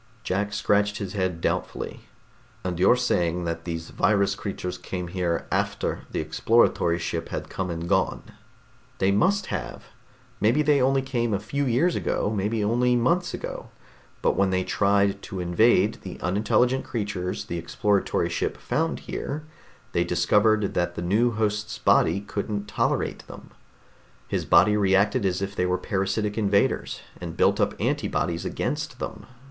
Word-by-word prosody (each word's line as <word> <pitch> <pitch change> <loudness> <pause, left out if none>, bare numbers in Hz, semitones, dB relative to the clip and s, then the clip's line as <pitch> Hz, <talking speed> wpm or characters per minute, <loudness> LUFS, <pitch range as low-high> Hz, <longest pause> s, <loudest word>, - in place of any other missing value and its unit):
Jack 100 +2 -1
scratched 105 0 +1
his 100 -3 -5
head 95 -4 -1
doubtfully. - - -2 0.6
"And 90 -2 -3
you're 95 +6 +6
saying 90 -8 0
that 85 0 -4
these 80 -1 -5
virus 100 -2 +2
creatures 90 -3 -5
came 90 -1 -5
here 85 -2 -1
after - - -1
the - - -3
exploratory 85 +1 +2
ship 85 -1 -3
had - - -5
come 95 -1 -3
and 85 0 -4
gone?" - - +1 0.7
"They 95 +1 +2
must 190 - +1
have! - - -5 0.6
Maybe 120 +9 +3
they 145 -2 +3
only 135 +1 +3
came 120 -5 0
a - - -1
few 140 +7 -2
years 135 +9 +2
ago, 105 - -1
maybe 105 +2 0
only 120 +3 +2
months 170 +10 +1
ago. - - -7 0.5
But - - +3
when 100 -1 +2
they 95 0 +1
tried 100 0 +2
to 95 -4 -6
invade 100 +4 +3
the 95 - -8
unintelligent 110 +8 +1
creatures 100 -5 -3
the 85 - -4
exploratory 100 +4 0
ship - - -2
found 160 +7 -1
here, 150 +2 -5 0.5
they 85 - +2
discovered 105 +5 +2
that 85 0 -1
the 85 - -4
new 105 +7 +3
host's 105 -1 -1
body 100 - +3
couldn't 100 0 -4
tolerate - - -1
them. - - -12 0.8
His - - -2
body 105 0 +5
reacted 100 0 +3
as 90 +1 -1
if 100 +1 -4
they 90 - +1
were 90 0 +1
parasitic 100 +2 -1
invaders, 100 -1 +1 0.2
and 85 -2 -7
built - - +3
up - - 0
antibodies 85 -1 -1
against - - -3
them. - - -6
100 Hz, 155 wpm, -25 LUFS, 90-110 Hz, 0.8 s, you're